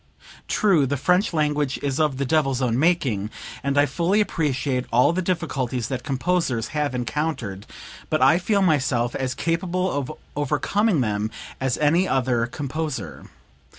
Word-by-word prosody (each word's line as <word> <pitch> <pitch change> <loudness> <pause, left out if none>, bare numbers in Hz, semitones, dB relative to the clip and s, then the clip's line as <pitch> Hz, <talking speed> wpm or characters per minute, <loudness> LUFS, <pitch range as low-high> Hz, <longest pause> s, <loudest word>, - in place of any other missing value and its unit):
True 175 -10 +3
the 145 +2 -1
(French) 180 - +2
language 150 -3 0
is 140 0 -1
of 150 -4 +1
the 140 - -1
devil's 135 -2 +1
own 125 -2 +1
making, 135 - +1 0.3
and 140 +1 0
I 145 - +6
fully 170 +9 +1
appreciate 135 -9 0
all 125 +7 +4
the 185 - 0
difficulties 135 -9 -2
that 130 -2 -3
composers 140 -4 0
have 150 -4 -1
encountered; 120 -6 -3 0.4
but - - +1
I 135 +7 +5
feel 200 +2 +1
myself 135 -8 +1
as 130 -1 -2
capable 180 +2 -1
of 140 -2 -2 0.2
overcoming 150 - +1
them 105 -2 -1 0.3
as 130 -2 0
any 165 +5 +3
other 125 -3 +1
composer. 140 - -5
145 Hz, 150 wpm, -23 LUFS, 125-165 Hz, 0.4 s, I